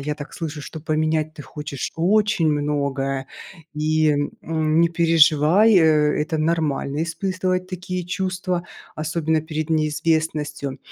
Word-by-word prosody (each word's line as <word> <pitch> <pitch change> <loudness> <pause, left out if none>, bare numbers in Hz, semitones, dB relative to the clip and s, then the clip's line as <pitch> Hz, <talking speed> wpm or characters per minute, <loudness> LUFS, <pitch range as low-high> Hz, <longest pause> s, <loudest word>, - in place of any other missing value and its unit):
я 150 +2 -3
так 145 -1 -9
слышу, 160 -2 -5
что 160 +2 -8
поменять 155 0 0
ты 150 - -9
хочешь 150 -3 -6
очень 195 -1 +2
многое, 140 -2 -1 0.5
и, 155 +1 +2 0.3
м, 160 0 +1
не 170 - +4
переживай, 165 +4 +4
это 155 -1 +3
нормально 155 -2 0
испытывать 185 +1 -2
такие 180 -1 -4
чувства, 185 -1 -2 0.3
особенно 160 0 0
перед 155 0 -4
неизвестностью. 155 -2 -1
155 Hz, 115 wpm, -22 LUFS, 150-170 Hz, 0.5 s, не